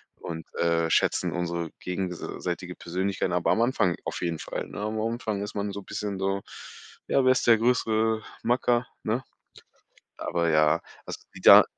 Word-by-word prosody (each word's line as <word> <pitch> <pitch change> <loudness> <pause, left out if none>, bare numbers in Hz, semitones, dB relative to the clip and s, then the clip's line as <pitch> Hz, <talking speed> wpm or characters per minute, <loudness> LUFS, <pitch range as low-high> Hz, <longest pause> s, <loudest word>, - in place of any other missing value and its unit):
Und, 80 -2 -7
äh, 85 -1 +2
schätzen - - +2
unsere 85 -1 -2
gegenseitige 90 0 -4
Persönlichkeiten, 95 +3 -2
aber 90 -1 +2
am 115 - +3
Anfang 115 -8 +2
auf - - -4
jeden 85 -2 -1
Fall, - - -4
ne? - - -7
Am 110 +1 -2
Anfang 110 -2 -2
ist 105 - -6
man 100 0 -2
so 100 - -6
'n - - -19
bisschen 105 -2 -3
so: 95 +1 0 0.7
Ja, 135 - +3
wer 130 - +6
ist 130 - +2
der 115 -1 +8
größere 110 -2 +2 0.2
Macker, 120 0 +2 0.2
ne? 115 +4 0 1.0
Aber 85 -1 0
ja, 75 +1 +4 0.2
also, - - -6
die - - -10
da - - +10
100 Hz, 170 wpm, -27 LUFS, 85-110 Hz, 1.0 s, da